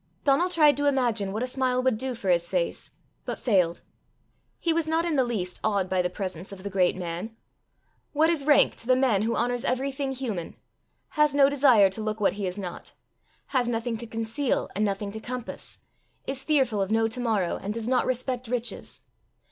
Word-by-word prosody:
Donal 295 +5 +3
tried 305 -4 +5
to 290 0 +1
imagine 235 -8 +1
what 215 +4 -2
a - - -1
smile 255 -1 0
would 255 -4 +1
do 260 0 -3
for 195 -5 -1
his 170 -1 +1
face, - - -2 0.3
but - - -4
failed. 185 -8 +1 0.8
He 335 - +1
was 325 -1 0
not 325 +1 +1
in 335 -3 0
the 265 - +4
least 200 -7 -3
awed 200 -4 0
by 185 -1 +3
the 180 - -1
presence 185 -1 -6
of 190 -1 -10
the 200 - -5
great 185 -2 +2
man. 180 +5 -5 0.8
What 310 +2 +3
is 300 -4 -1
rank 295 - +5
to 230 - -6
the 255 - +5
man 250 -7 +2
who 230 +2 0
honours 245 0 0
everything 270 +2 -1
human, 225 -10 -4 0.5
has 300 -2 +2
no 280 -1 +6
desire 255 -9 +5
to 220 - -4
look 215 0 -3
what 205 - +2
he 200 -1 -3
is 180 +2 -5
not, 180 -4 -7 0.6
has 255 -3 +1
nothing 230 0 -1
to 235 +1 -8
conceal 225 +5 -2
and 210 - +1
nothing 200 0 -1
to 220 - -6
compass, 245 +1 -6 0.5
is 270 0 -1
fearful 265 -9 +2
of 195 - -1
no 225 +1 +2
to 235 +3 -5
morrow, 215 -7 0
and 200 - -3
does 225 +1 -4
not 255 0 +2
respect 255 0 -2
riches! 245 0 -3
235 Hz, 205 wpm, -26 LUFS, 200-265 Hz, 0.8 s, no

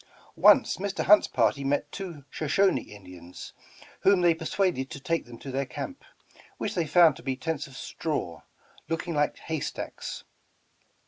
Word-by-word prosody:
Once - - +5
Mr. 195 +1 -2
Hunt's 210 +1 +7
party 115 +3 +1
met 140 +1 -1
two 170 -8 -7
Shoshoni 155 - +1
Indians, 90 -3 -11 0.5
whom 195 -2 +4
they 175 -1 +5
persuaded 165 -4 -1
to 140 - -7
take 165 +4 -1
them 120 -1 -11
to 135 - -8
tlieir 135 0 -2
camp, 275 - -6 0.5
which - - -3
they 170 -3 -1
found 165 -1 +6
to - - -12
be 130 0 -2
tents 150 +2 -3
of 135 -1 -12
straw, 145 - -4 0.5
looking 165 +1 -2
like 145 -1 +1
haystacks. 160 -3 -5
150 Hz, 150 wpm, -27 LUFS, 130-175 Hz, 0.5 s, Hunt's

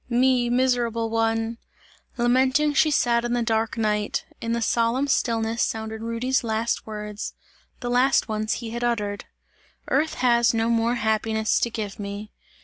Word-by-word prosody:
Me, 250 0 +3
miserable 240 -2 +1
one!" 225 0 0 0.6
Lamenting, 260 +5 +3
sat 245 -6 +3
she - - -5
in 240 - -2
the 240 -1 +1
dark 225 0 0
night. 210 -2 0 0.2
In 230 - -2
the 235 - 0
solemn 235 +4 +1
stillness, 230 -4 0
sounded 220 0 -2
Rudy's 230 +3 -1
last 225 0 -1
words; 210 -1 -6 0.5
the 245 - -3
last 255 +2 +3
ones 215 -1 -1
he 230 -2 -5
had 235 +1 -4
uttered: 210 -4 -1 0.6
"Earth 305 +3 +1
has 235 -2 +3
no 225 +1 +1
more 230 +1 +2
happiness 220 -1 +1
to 235 - 0
give 215 -3 -5
me!" 205 +1 -6
230 Hz, 150 wpm, -24 LUFS, 220-245 Hz, 0.6 s, Me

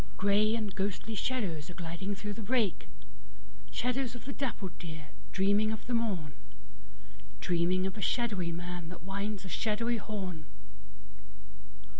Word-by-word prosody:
Grey 205 +3 +5
and 215 -4 -1
ghostly 200 +3 -1
shadows 195 -10 0
are 175 - -7
gliding 175 +4 -2
through 205 +1 -3
the 225 - -5
brake; 220 -3 +2 0.8
Shadows 245 - 0
of 240 - -8
the 275 - -3
dappled 210 -10 -2
deer, 160 -3 -6 0.2
dreaming 205 +3 +4
of 220 - -4
the 245 - -1
morn, 195 -11 +1 1.1
Dreaming 180 +1 +3
of 190 - -1
a 210 - -4
shadowy 200 -7 +2
man 175 0 -3
that 180 -2 -8
winds 200 +1 -2
a - - -4
shadowy 215 +9 +1
horn. 185 -8 -4
200 Hz, 140 wpm, -33 LUFS, 175-220 Hz, 1.1 s, Grey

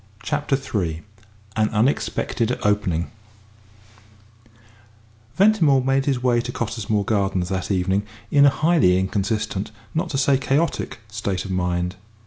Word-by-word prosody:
CHAPTER 145 0 0
III 90 - -3 0.5
AN 110 -1 +2
UNEXPECTED 120 0 0
OPENING 95 -5 0 2.2
Ventimore 175 -10 +4
made 135 +1 +1
his 130 -3 0
way 120 -2 +3
to 125 - -5
Cottesmore 110 -3 -2
Gardens 95 -4 0
that 95 -2 -2
evening 95 0 +1 0.3
in 145 0 +6
a - - +8
highly 155 - +3
inconsistent, 100 +1 -1 0.2
not 165 +2 -1
to 140 - -2
say 135 -1 +3
chaotic, 140 +3 0
state 100 -3 -3
of 95 - -5
mind. 90 0 -1
110 Hz, 120 wpm, -22 LUFS, 95-135 Hz, 2.2 s, a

